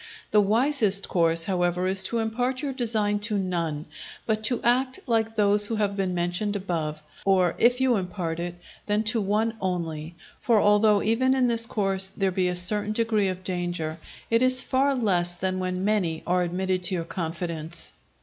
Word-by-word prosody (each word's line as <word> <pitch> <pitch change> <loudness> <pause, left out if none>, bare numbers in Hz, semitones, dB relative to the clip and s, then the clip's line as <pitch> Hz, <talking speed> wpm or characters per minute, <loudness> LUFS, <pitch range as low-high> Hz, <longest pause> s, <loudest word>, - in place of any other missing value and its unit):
The 210 - +5
wisest 215 -2 +2
course, 165 -2 +3
however, 180 -1 0
is 190 +1 +2
to 235 - 0
impart 245 +4 -2
your 280 -2 -2
design 220 -5 +1
to 210 0 -1
none, 170 -5 -3 0.4
but 220 -1 -1
to 245 +1 +1
act 255 +2 +1
like 225 -1 0
those 205 -1 +4
who 225 - -2
have 205 -2 -1
been 190 -2 -2
mentioned 175 +4 -1
above; 160 -6 -4 0.2
or 185 -3 +2
if 245 +2 +3
you 260 -2 +2
impart 180 -3 -4
it, 175 0 -5 0.3
then 210 +1 +1
to 225 +1 +1
one 215 +3 0
only: 165 -3 -4 0.2
for 230 -4 +2
although 210 0 +3
even 260 +4 +2
in 255 -2 +2
this 230 -1 +3
course 195 -3 +1
there 195 -2 +1
be 185 0 0
a 180 - -2
certain 205 +4 +1
degree 220 -3 +1
of 185 0 -4
danger, 175 -3 -3 0.3
it 230 +1 +3
is 255 0 +5
far 270 +2 +1
less 180 -7 0
than 185 +1 -2
when 185 0 -3
many 185 -7 0
are 180 +1 +1
admitted 185 +1 -1
to 185 +1 0
your 165 -2 -3
confidence. 165 -1 -2
195 Hz, 180 wpm, -25 LUFS, 175-225 Hz, 0.4 s, The